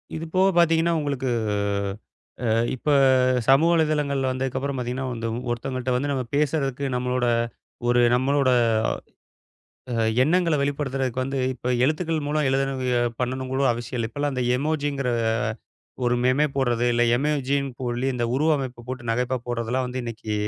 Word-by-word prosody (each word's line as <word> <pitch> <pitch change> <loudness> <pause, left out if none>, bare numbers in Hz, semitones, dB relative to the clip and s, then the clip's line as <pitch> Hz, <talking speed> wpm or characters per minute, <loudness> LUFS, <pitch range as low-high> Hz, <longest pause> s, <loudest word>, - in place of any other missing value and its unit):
இது 160 +1 -4
போகப் 190 0 +3
பார்த்தீங்கன்னா 170 0 +4
உங்களுக்கு, 140 -3 -2 1.2
அ, - - +1 0.3
இப்ப 130 - -4 0.6
சமூக 145 +5 +6
வலைதளங்கள்ல 145 -4 +1
வந்ததுக்கு 130 0 -2
அப்புறம் 140 0 -3
பார்த்தீங்கன்னா, 125 +2 -3
வந்து 115 -1 -4 0.2
ஒருத்தங்கள்ட்ட 130 +1 -2
வந்து 145 +3 -1
நம்ம 130 -2 -1
பேசுறதுக்கு 140 -2 0
நம்மளோட 125 0 0 0.6
ஒரு 120 0 +4
நம்மளோட, 135 +1 +2 1.4
அ - - -1 0.3
எண்ணங்கள 170 +2 +2
வெளிப்படுத்துறதுக்கு 135 -3 -1
வந்து, 135 +1 -3 0.2
இப்ப 125 0 -2
எழுத்துக்கள் 155 0 -1
மூலம் 150 -1 +1
எழுதணுவுக 135 -2 0 0.3
பண்ணணுங்கூட 130 +1 -2
அவசியம் 120 +1 -5
இல்ல. 115 -1 -2
இப்பெல்லாம் 145 +2 -2
அந்த 125 -1 -1
எமொஜிங்கிற 145 -3 -1 1.0
ஒரு 120 - +2
மெமே 135 +4 +3
போடுறது 120 -3 +1
இல்ல, 120 0 +3
எமொஜி 140 -1 0 0.2
போலி 125 +1 -1
இந்த 120 -1 0
உருவ 155 +4 +2
அமைப்ப 125 -3 -6
போட்டு 120 -2 -4
நகைப்பா 125 +2 -1
போடுறதெல்லாம் 120 +2 -1
வந்து 130 +1 -4
இன்னைக்கு 110 -2 -4
135 Hz, 140 wpm, -24 LUFS, 125-145 Hz, 1.4 s, சமூக